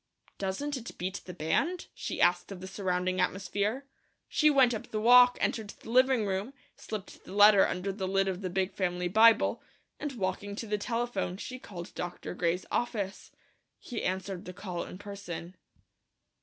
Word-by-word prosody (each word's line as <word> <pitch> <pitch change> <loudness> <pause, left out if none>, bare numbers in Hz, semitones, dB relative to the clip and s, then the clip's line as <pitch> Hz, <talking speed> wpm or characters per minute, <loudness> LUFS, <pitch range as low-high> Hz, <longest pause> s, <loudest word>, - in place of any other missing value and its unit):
"Doesn't 200 +10 -2
it 240 -2 -9
beat 185 +2 -3
the 180 - -7
band?" 280 - 0
she - - -5
asked 175 +2 +3
of 195 - -7
the 185 - -8
surrounding 185 -1 -1
atmosphere. 200 +7 -1 0.4
She 305 - +4
went 265 -4 +5
up 220 - -5
the 215 - -3
walk, 245 +2 +7
entered 220 -3 -1
the 225 - -10
living 255 -2 +4
room, 200 +7 -2 0.2
slipped 215 -3 -7
the - - -10
letter 205 0 +7
under 185 +2 -2
the 190 -1 -3
lid 195 0 +2
of 190 0 -2
the 185 - -2
big 190 +1 -1
family 180 -1 -1
Bible, 220 +5 +5 0.4
and 295 -2 -3
walking 200 -2 -3
to 225 - -5
the 210 -1 -1
telephone 230 -5 -2
she 255 +5 -7
called 175 -7 -9
Dr. 175 0 -5
Gray's 180 0 0
office. 205 -5 -2 0.5
He 235 - -6
answered 190 +1 -3
the 180 - -7
call 180 -2 -5
in - - -9
person. 195 -3 -7
200 Hz, 170 wpm, -30 LUFS, 185-230 Hz, 0.5 s, walk